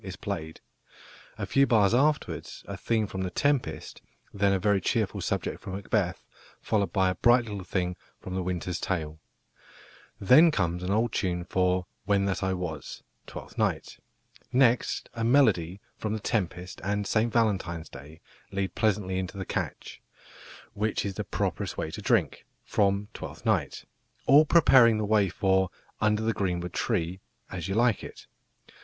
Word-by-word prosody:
is - - -6
played. 80 0 -5 0.8
A - - -3
few 135 0 +3
bars 105 -4 +4
afterwards 150 +4 0
a - - -5
theme 110 -2 0
from 95 -1 -5
The 95 - -2
Tempest, 120 - -1 0.3
then 100 -1 +2
a 95 - +3
very 100 +1 +2
cheerful - - -1
subject - - -2
from 95 - -7
Macbeth, 95 -2 -1 0.3
followed 100 -5 0
by 95 0 +2
a - - -1
bright 120 +4 +4
little 100 -3 -6
thing 90 -1 -2 0.2
from 95 - -7
The 95 - -1
Winter's 90 -1 -3
Tale. 80 -4 -3 1.0
Then 135 - +7
comes 90 - -1
an 90 - -4
old 110 +3 +1
tune 90 -4 -1
for 90 0 +1 0.2
"When 100 -1 +2
that 95 -1 -1
I 95 -1 0
was" 85 -6 -6 0.2
(Twelfth - - -9
Night); - - -1 0.5
next 125 -2 +2
a 115 -1 -3
melody 105 - +3 0.2
from 110 -1 -2
The 110 - -2
Tempest 90 -3 -3
and 105 +1 -1
"St 115 +3 +1
Valentine's 95 -8 0
Day" 75 +4 -12 0.3
lead 95 -1 -2
pleasantly 100 -4 0
into 95 +1 -5
the 95 - -4
catch, - - -5 0.7
"Which 105 +1 -1
is 100 - -2
the - - -4
properest - - -3
day - - -3
to - - -7
drink," - - 0 0.2
from 100 +1 +1
Twelfth - - -9
Night, - - 0 0.4
all 145 +3 +7
preparing 130 -9 +6
the 110 - -1
way 105 -2 +3
for 95 0 +1 0.3
"Under 110 0 +1
the 115 0 +1
greenwood 90 -3 -2
tree" 95 -5 -1 0.3
(As 90 -1 -4
You 95 - -2
Like 115 -2 +2
It). - - -10
100 Hz, 160 wpm, -27 LUFS, 90-110 Hz, 1.0 s, Then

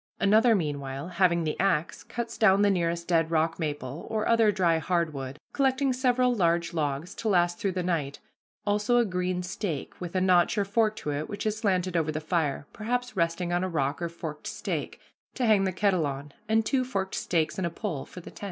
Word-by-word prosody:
Another, 220 +3 +5
meanwhile, 145 -3 -3
having 170 -2 +2
the 155 -1 -1
axe, 175 -5 0
cuts 235 -1 -5
down 200 -2 +4
the 205 - +4
nearest 170 -2 -1
dead 165 -2 +2
rock 165 0 +1
maple 145 -2 -4
or 220 -1 -1
other 230 -2 +4
dry 175 -5 +2
hard 170 0 0
wood, 135 0 -6 0.2
collecting 270 -1 +2
several 250 -1 +2
large 170 -5 +1
logs 155 +3 -2
to 230 -1 -3
last 175 -2 +2
through 195 -2 -1
the 180 0 -2
night, 160 -6 -1 0.5
also 210 +4 +2
a 240 - +4
green 180 -2 -1
stake, 180 -4 -4
with 175 0 -6
a - - +3
notch 185 +2 +3
or 200 - +2
fork 215 +1 +1
to 150 - -4
it, 145 +2 -3
which 205 - -5
is 215 -1 +1
slanted 185 -5 0
over 160 -2 +1
the 155 - -3
fire, 155 -3 -1
perhaps 245 +2 -2
resting 170 0 0
on 175 +1 +1
a 185 - -1
rock 140 -2 -1
or 170 - -1
forked 160 -2 -7
stake, - - -4 0.4
to 255 - 0
hang 210 -3 +4
the 190 - 0
kettle 185 -4 +1
on, 140 +1 -6 0.2
and 220 0 +3
two 265 +1 +1
forked 195 -7 -3
stakes 165 +1 0
and 180 - 0
a - - -2
pole 170 -5 -4
for 180 - -11
the - - -11
tent. - - -14
180 Hz, 215 wpm, -27 LUFS, 160-210 Hz, 0.5 s, Another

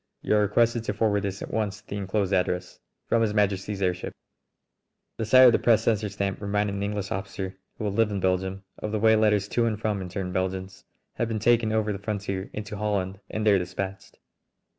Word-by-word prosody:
You - - +2
are 105 - +4
requested 115 +3 +2
to - - -1
forward 105 -2 +1
this 100 -1 -4
at - - -7
once 105 -2 -1
to 105 - -27
the - - -5
inclosed 100 0 -1
address. 90 -1 -1 0.3
From 115 - +2
His 105 -2 +1
Majesty's 100 -1 0
airship 90 -1 -1 0.5
." - - -55
The 110 - 0
sight 130 +4 +7
of 125 - +9
the - - +2
press 115 -2 +4
censor 110 -2 +1
stamp 100 0 -3
reminded 105 0 0
an 100 - -3
English 100 -1 -3
officer, 95 0 -4 0.2
who 110 - -4
had 100 - -1
lived 110 0 +2
in 100 - -1
Belgium, 95 +1 -1 0.2
of 105 - -4
the 110 - 0
way 110 +1 +5
letters 105 -2 +3
to 120 - +1
and 110 -2 -2
from 105 -3 -1
interned 90 0 -4
Belgians 95 +1 -3 0.3
have 120 - 0
been 115 -1 -2
taken 115 0 +3
over 110 -1 +1
the 100 - -6
frontier 100 -2 -3
into 105 0 -6
Holland 100 -2 -1
and 110 0 -3
there 100 -2 +5
dispatched. 95 +2 -5
100 Hz, 215 wpm, -26 LUFS, 95-110 Hz, 0.5 s, of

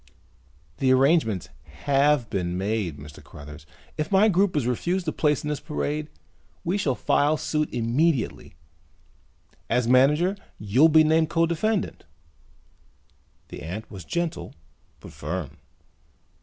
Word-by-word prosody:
"The 130 -1 +3
arrangements 130 - +2 0.4
have 140 -2 +3
been 90 -2 -2
made, 100 -5 -2
Mr. 75 0 -12
Cruthers. 75 +1 -12 0.3
If 155 +4 -2
my 200 +3 +5
group 190 -3 +2
is 140 - 0
refused 175 +9 -1
a - - +1
place 150 -2 0
in 150 - -3
this 150 - -2
parade 150 -1 -3 0.6
we 175 +3 -1
shall 135 -9 0
file 150 +5 +2
suit 155 -1 -2
immediately. 125 +4 -1 1.1
As 120 0 +1
manager 150 +9 +4 0.2
you'll 120 +10 +4
be 160 0 +6
named 160 +1 +2
co 165 0 +2
defendant." 190 +5 -2 1.4
The - - -9
ant 90 +8 -7
was 95 -4 -8
gentle 155 - -4 0.4
but - - -12
firm. 75 -2 -5
145 Hz, 130 wpm, -25 LUFS, 105-160 Hz, 1.4 s, be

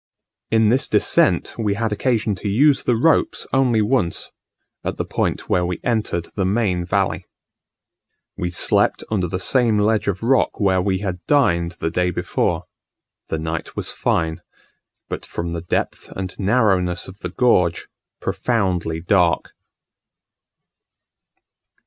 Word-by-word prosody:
In 110 -1 +3
this 130 +4 +2
descent - - +2
we 105 -3 0
had 115 +1 -1
occasion 110 -1 0
to 100 +2 -5
use 135 +7 +4
the 120 - +3
ropes 155 +7 +2
only 125 -5 +3
once, 105 -6 0 0.5
at - - -3
the - - -2
point - - -2
where 90 - +2
we 90 0 -2
entered 110 -8 -1
the 100 - -1
main 95 -2 +1
valley. 85 - -1 1.1
We 90 - -2
slept 90 - +1
under 95 -5 0
the 90 +2 -3
same 115 0 +2
ledge 105 +1 +1
of 100 +1 -2
rock 130 +3 +2
where 95 -3 +2
we 95 0 0
had 90 -2 -4
dined 85 -12 +2
the 80 0 -3
day 90 +1 +1
before: 90 - -1 0.6
the - - -2
night 80 0 -4
was - - -2
fine, 80 -1 -1 0.7
but - - -5
from 85 0 -5
the 85 - -4
depth 85 - -3
and 95 -1 -5
narrowness 95 -5 +1
of 95 +1 -12
the 90 - -5
gorge, 90 -6 +2 0.3
profoundly 90 -8 -1
dark. 90 -1 +2
95 Hz, 140 wpm, -21 LUFS, 90-115 Hz, 1.1 s, use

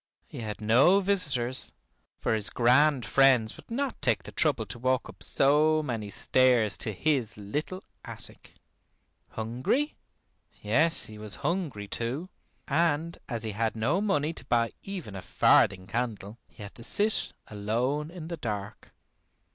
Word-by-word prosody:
He - - -10
had 110 -2 -5
no 125 - +5
visitors, 140 -11 0 0.5
for - - 0
his 110 -2 +1
grand 125 +2 +3
friends 125 -2 +4
would - - -16
not 265 +2 -3
take 120 -6 +1
the - - -10
trouble - - +1
to - - -7
walk 130 0 0
up - - -14
so 155 +3 +3
many 115 -7 -4
stairs 120 -2 +2
to 110 - +1
his 125 0 -1
little 150 - -4 0.2
attic. - - -11 0.7
Hungry? 125 - -1 0.7
Yes, 150 +11 +3
he 110 -1 -9
was 105 -1 -2
hungry 150 - -2
too, 125 - -4 0.4
and 165 +2 0
as 115 -3 -3
he 110 - -3
had 110 +2 -1
no 130 - +1
money 160 -7 0
to - - -6
buy 115 -1 +1
even 180 - -7
a 95 - -6
farthing 95 +1 +3
candle, 110 -1 -4
he 105 - -13
had 100 - -9
to - - -10
sit 210 - +2
alone 120 +9 -2
in 170 -2 -8
the 170 0 -5
dark. 105 -6 -6
125 Hz, 150 wpm, -28 LUFS, 110-155 Hz, 0.7 s, no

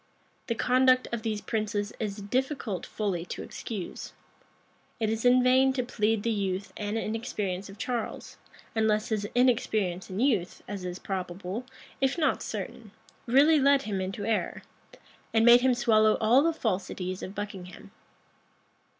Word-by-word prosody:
The 230 - 0
conduct 255 +1 +3
of 235 -2 -2
these 215 -2 -2
princes 215 -2 -2
it - - -2
is 200 -1 -4
difficult 230 - -2
fully 195 -6 -2
to - - -6
excuse. 205 -6 -6 0.9
It 220 -1 +1
is 225 +2 -2
in 250 0 +6
vain 260 +1 +4
to 255 -1 -1
plead 220 -3 0
the 230 - +1
youth 195 -2 -2
and 210 +1 -3
inexperience 210 -4 -3
of 195 - -11
Charles; 235 0 -4 0.4
unless 220 0 +1
his 210 -2 -1
inexperience 215 -7 +1
and 190 +1 -4
youth, 220 -9 0
as 195 -2 -5
is 180 0 -4
probable,[] 190 +5 -5 0.3
if 270 +3 +2
not 315 - +1
certain, 225 -3 -6 0.4
really 290 +6 +5
led 280 0 +4
him 200 -5 -2
into 195 +2 -4
error, 225 -1 -1 0.7
and 225 0 +5
made 240 +1 +8
him 255 -1 +3
swallow 215 -3 +4
all 235 +5 +5
the 330 +3 +3
falsities 185 - -3
of 190 - -7
Buckingham. 195 -3 -7
220 Hz, 150 wpm, -28 LUFS, 200-245 Hz, 0.9 s, made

